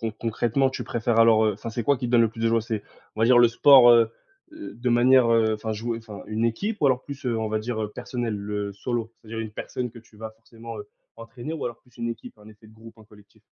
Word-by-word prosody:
con 115 -2 -3
concrètement, 120 +4 0
tu - - -6
préfères 115 -1 -1
alors, 115 -1 +5
heu, 105 - +2
enfin, 115 +3 -7
c'est 120 +1 -3
quoi 140 +5 +2
qui 125 - -3
te - - -5
donne 120 - +5
le 115 - +3
plus 115 0 -11
de - - +2
joie? 115 0 +2
C'est 110 -2 -4 0.3
on 110 - -4
va 115 - +4
dire, 125 0 +6
le 120 -1 +6
sport, 125 0 +7
heu, 115 -1 +5 0.4
de 125 - -6
manière, 125 +1 +5
heu 110 -1 +3
enfin 110 +1 -4
jouer 115 +2 -4
enfin, 110 -3 -10
une 110 +2 -2
équipe? 200 - -2
Ou 150 - +3
alors 130 -1 +2
plus, 140 0 -9
heu, 115 - 0
on 110 -1 -2
va 110 - -1
dire, 110 0 -4
heu, 105 - -4
personnel, 120 -3 -4
le 100 0 -4
solo? 115 +2 -4
C'est-à-dire 115 0 -7
une 110 - -5
personne 125 +3 -5
que 115 - -13
tu 115 -1 -20
vas 110 +1 -7
forcément, 115 0 -11
heu, 105 - -9 0.3
entraîner 120 +5 -8
ou 155 - -5
alors 120 -1 -5
plus 125 - -26
une 115 - -3
équipe, 115 0 -8
un 105 +1 -15
effet 110 0 -17
de - - -18
groupe, 115 +1 -15
un 110 - -16
collectif? 105 -1 -21
115 Hz, 275 wpm, -24 LUFS, 110-120 Hz, 0.4 s, sport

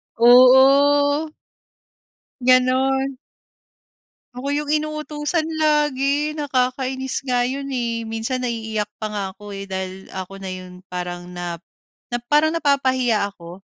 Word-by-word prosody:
Oo. 275 +5 +6 1.1
Ganun. 260 +1 +2 1.2
Ako 255 +2 -6
yung 295 0 -1
inuutusan 305 +1 -1
lagi 295 -1 +1
nakakainis 265 -1 -2
nga 245 -2 +1
iyon 275 +1 -4
eh, 235 -2 -2
minsan 225 +3 -3
naiiyak 220 -3 -3
pa 215 - -2
nga 210 -1 -4
ako 205 +1 -10
eh, 195 - -6
dahil 190 0 -6
ako 190 0 -7
na 190 - -4
iyon 185 0 -10
parang 175 0 -5
na 175 -1 -5 0.6
na 240 - 0
parang 300 +3 +3
napapahiya 260 -8 +1
ako. 175 0 -12
255 Hz, 115 wpm, -21 LUFS, 210-285 Hz, 1.2 s, Oo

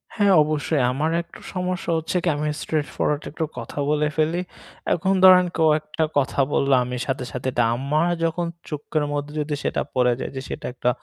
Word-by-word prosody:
হ্যাঁ, 205 -3 +4
অবশ্যই 150 -1 0
আমার 150 +5 0
একটা 170 - -14
সমস্যা 180 -1 -2
হচ্ছে 165 +3 -2
কি - - -1
আমি 150 +1 -2
স্ট্রেইট 155 -2 -1
ফরওয়ার্ট 150 0 0
একটু 160 - -3
কথা - - -6
বলে 150 0 +2
ফেলি। 160 +3 +1 0.5
এখন 190 +3 +1
ধরেন 185 -1 +8
কেউ 160 -1 +3
একটা 155 +1 -3
কথা 140 0 0
বলল, 140 -1 +1
আমি 125 0 -4
সাথে, 135 -1 -2
সাথে 125 +1 -4
এটা 120 - +2
আমার 150 +7 +1
যখন 165 +1 0 0.2
চোখের 150 0 -2
মধ্যে 145 0 -3
যদি 150 0 -1
সেটা - - 0
পড়ে 125 -1 +3
যায় - - -4
যে 130 - -3
সেটা - - -6
একটা 125 -1 0
150 Hz, 190 wpm, -23 LUFS, 140-165 Hz, 0.5 s, ধরেন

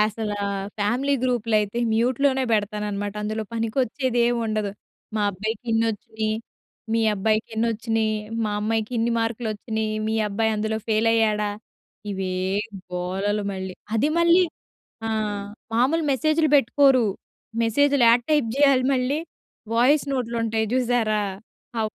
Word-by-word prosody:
అసల 215 0 0 0.5
family 250 +7 +1
గ్రూప్‌లయితే 230 -3 +1
mute 235 +3 +1
లోనే 265 -1 +3
పెడతాన‌న్నమాట 205 -1 -1
అందులో 215 +1 -2
పనికొచ్చే‌దేం 240 +1 +1
ఉండదు. 215 -2 -1 0.5
మా 210 - +1
అబ్బాయికి 215 +4 -4
ఇన్నొచ్చినాయి, 220 -1 -1 0.6
మీ 230 - +2
అబ్బాయికి 215 +2 0
ఎన్ని 225 +1 +1
వచ్చినాయి? 225 -1 0 0.3
మా 210 - -1
అమ్మాయికి 220 +2 -1
ఇన్ని 230 +1 +1
మార్కులొచ్చినాయి, 220 -1 -2
మీ 220 - 0
అబ్బాయందులో 220 +1 0
ఫెయిల్ 220 +1 +3
అయ్యాడా? 210 -2 +2 0.6
ఇవే 190 -1 -2 0.6
గోలలు 195 +4 -1
మళ్ళీ. 190 -1 -5 0.2
అది 255 +7 +2
మళ్ళీ 340 +2 +5 0.6
ఆ! - - -1 0.7
మామూలు 275 +8 +2
మెసేజ్‌‌లు 310 +3 +2
పెట్టుకోరు 270 -1 +4 0.6
మెసేజ్‌లు 280 +3 +3
యాడ 235 +1 +6
టైప్ 295 -7 +3
చేయాలి 275 -3 +4
మళ్ళీ 260 +4 0 0.6
వాయిస్ 265 +6 +4
నోట్లుంటాయి 230 -3 -1
చూసారా? 235 -4 +1 0.6
ఆ - - +1
225 Hz, 115 wpm, -24 LUFS, 215-250 Hz, 0.7 s, యాడ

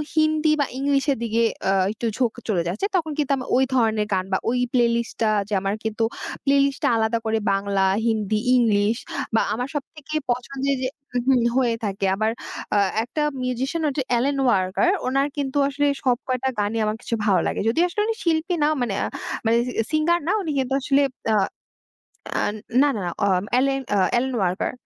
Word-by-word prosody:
হিন্দি 310 0 +3
বা 285 - +3
ইংলিশের 280 0 +1
দিকে 230 0 0 0.3
আ - - +4 0.2
একটু 220 +2 -5
ঝোঁক 245 -4 +1
চলে 195 -6 +1
যাচ্ছে, 185 - -2
তখন 325 -4 0
কিন্তু 290 -2 0
আমার 255 - -6
ওই 265 - +4
ধরনের 220 -3 +2
গান, 185 -1 0
বা - - +4
ওই 245 +1 +1
প্লেলিস্ট, 240 -2 +4
লিস্ট - - -12
টা 215 - +3 0.2
যে 210 - -3
আমার 195 +1 -1
কিন্তু 220 +1 -1 0.4
প্লে 275 0 +3
লিস্টটা 275 -1 0
আলাদা 220 +1 +1
করে 225 0 +1 0.2
বাংলা, 195 0 0 0.3
হিন্দি, 215 -2 0 0.2
ইংলিশ 220 -2 +3 0.4
বা - - +4
আমার 245 +3 -2
সবথেকে 305 +1 -6 0.2
পছন্দের 275 +3 -1
যে 255 - 0 0.3
উহু, 250 +2 +2 0.2
হয়ে 240 -3 +2
থাকে। 200 -1 -2
আবার 220 +2 +1 0.4
আ - - +5 0.2
একটা 250 +6 -4 0.2
মিউজিশিয়ান 260 +6 -2
হচ্ছেন 280 0 -1 0.2
এলেন 275 +4 +1
ওয়াকার 195 - +2 0.2
ওনার 275 +2 +2
কিন্তু 275 0 -2
আসলে 285 +1 0 0.2
সব 250 -3 +3
কয়টা 260 0 0
গানই 205 +2 0
আমার 215 0 -1
কাছে 230 - -2
ভালো 195 -4 +4
লাগে। - - -2
যদিও 325 +9 +2
আসলে 390 +4 -2
উনি 450 - 0
শিল্পী 330 +1 +1
না, - - +4
মানে 225 -5 -1
আ - - 0 0.4
মানে 225 +1 +4
সি - - -3 0.2
সিঙ্গার 315 +3 +2
না, 360 - +2
উনি 325 -5 -3
কিন্তু 265 0 -1
আসলে 275 +2 +3 0.3
আ - - +4 1.1
আন 205 - -1 0.3
না, 290 - +4
না, - - -3
না - - -1 0.2
অম 185 -1 +1
এলেন 270 +1 +1 0.2
অ - - +3 0.2
এলেন 260 +1 -1
ওয়াকার। 180 -1 0
250 Hz, 190 wpm, -23 LUFS, 215-280 Hz, 1.1 s, আ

